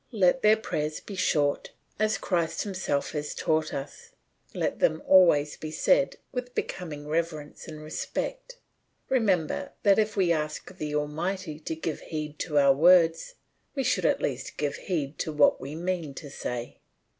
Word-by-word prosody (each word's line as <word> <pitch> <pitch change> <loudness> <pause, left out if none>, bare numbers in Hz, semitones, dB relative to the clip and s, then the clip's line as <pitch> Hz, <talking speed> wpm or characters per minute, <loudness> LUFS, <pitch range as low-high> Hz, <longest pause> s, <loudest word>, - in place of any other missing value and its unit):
Let 210 +2 +3
their 215 +1 +6
prayers 155 -8 -3
be 205 - -10
short, 150 -6 +1 0.3
as 215 0 +2
Christ 170 -3 -1
himself 185 -8 -2
has 150 -1 -4
taught 155 0 0
us. 140 +1 -7 0.4
Let - - -2
them 160 0 +2
always 170 -6 +5
be 155 - -6
said - - +2 0.2
with 250 -1 -5
becoming 150 -5 -4
reverence 155 -2 -3
and 155 -2 -8
respect; - - -4 0.5
remember 225 - +1
that 200 -1 +5
if 215 -1 0
we 180 -3 +3
ask 155 +3 -2
the 150 -4 -4
Almighty 155 +2 -2
to 160 +1 -4
give 160 -1 -3
heed 155 -2 -6
to 150 -4 -1
our 140 -1 +6
words, 165 - +4 0.4
we 270 - 0
should 225 -10 +2
at - - +1
least 130 -3 -3
give 145 -1 -1
heed 150 -6 -3
to 160 - -2
what 150 -1 +4
we 140 +3 -6
mean 170 -4 -3
to 145 -2 -8
say. 120 -2 -5
160 Hz, 160 wpm, -27 LUFS, 150-190 Hz, 0.5 s, their